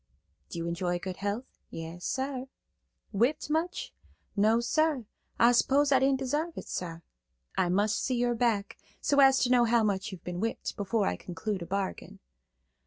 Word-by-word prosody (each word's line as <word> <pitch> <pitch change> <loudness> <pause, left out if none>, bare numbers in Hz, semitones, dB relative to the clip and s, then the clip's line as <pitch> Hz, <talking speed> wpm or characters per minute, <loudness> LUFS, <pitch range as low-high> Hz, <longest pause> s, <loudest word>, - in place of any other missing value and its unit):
"Do - - -7
you 165 0 -3
enjoy 175 +1 -1
good 185 +1 -6
health?" 205 +5 -2 0.2
"Yas, 165 +2 -7
sar." 265 -1 -2 0.7
"Whipped 250 +9 +1
much?" 330 +3 -1 0.4
"No, 215 +2 +4
sar. 290 +1 +1 0.3
I 235 +1 +6
s'pose 280 +4 +3
I 265 - +6
didn't 270 0 +2
desarve 300 +6 -1
it, - - -6
sar." 165 -2 -5 0.5
"I 180 - +2
must 205 +4 +1
see 255 - 0
your 240 0 +1
back, 225 -4 0 0.2
so 285 - +2
as 270 -1 +7
to 250 - +1
know 245 -1 +5
how 230 0 +3
much 200 0 0
you've 190 - -9
been 180 0 -4
whipped, 225 +3 -2
before 205 +1 0
I - - 0
conclude 185 +3 -4
a 170 - -6
bargain." 195 +1 -3
225 Hz, 175 wpm, -29 LUFS, 190-265 Hz, 0.7 s, as